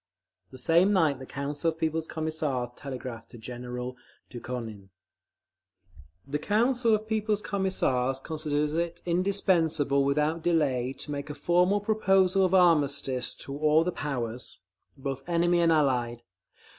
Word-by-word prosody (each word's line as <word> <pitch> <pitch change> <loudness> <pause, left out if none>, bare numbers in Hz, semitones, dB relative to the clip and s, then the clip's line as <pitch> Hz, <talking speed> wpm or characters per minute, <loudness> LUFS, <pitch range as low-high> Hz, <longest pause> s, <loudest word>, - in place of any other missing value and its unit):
The 130 - -12
same 170 +9 +4
night 155 -8 +2
the 130 - -9
Council 145 +3 -2
of 160 - -5
People's 160 0 -1
Commissars 155 -6 -2
telegraphed 125 -4 -7
to - - -12
General 125 +2 -6 0.4
Dukhonin:… 115 -5 -7 1.4
The 145 +2 -3
Council 230 - +2
of 215 0 -5
People's 215 -1 0
Commissars 135 -10 0
considers 150 0 -2
it 170 +1 -2
indispensable 170 -6 +2
without 150 +4 +1
delay 140 -7 +1
to 145 - -9
make 140 +1 -5
a 150 - -5
formal 180 +5 +2
proposal 195 -3 +3
of 185 0 +3
armistice 140 -7 +2
to 140 - -6
all 155 +2 +3
the 180 - -1
powers, 125 -6 -4 0.4
both 135 0 -4
enemy 175 +1 +2
and 170 -1 +4
Allied. 125 -6 +1
150 Hz, 130 wpm, -28 LUFS, 130-175 Hz, 1.4 s, same